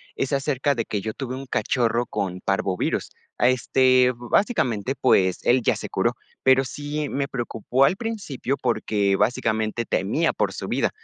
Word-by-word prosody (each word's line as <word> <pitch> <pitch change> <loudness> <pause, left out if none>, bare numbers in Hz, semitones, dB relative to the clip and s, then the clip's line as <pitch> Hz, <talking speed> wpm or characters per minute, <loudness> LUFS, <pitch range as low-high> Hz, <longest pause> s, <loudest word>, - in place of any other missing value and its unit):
es 135 - -2
acerca 140 0 +1
de 115 -4 -2
que 105 - -3
yo 110 +2 -4
tuve 130 0 -5
un 135 +1 -7
cachorro 120 0 0
con 90 -4 -3
parvovirus. 95 -1 -1 0.3
Ah, 125 - +4
este, 130 0 +3
básicamente, 125 - 0
pues, 95 -8 +3
él 125 +1 +3
ya - - +2
se - - -6
curó, - - 0 0.3
pero 130 0 +4
sí 145 +2 -4
me 140 0 -2
preocupó 125 +1 0
al 180 - +2
principio 195 - -3
porque, 105 -5 +1
básicamente, 110 +1 0
temía - - 0
por - - -1
su - - -6
vida, - - +1
125 Hz, 165 wpm, -24 LUFS, 110-135 Hz, 0.3 s, Ah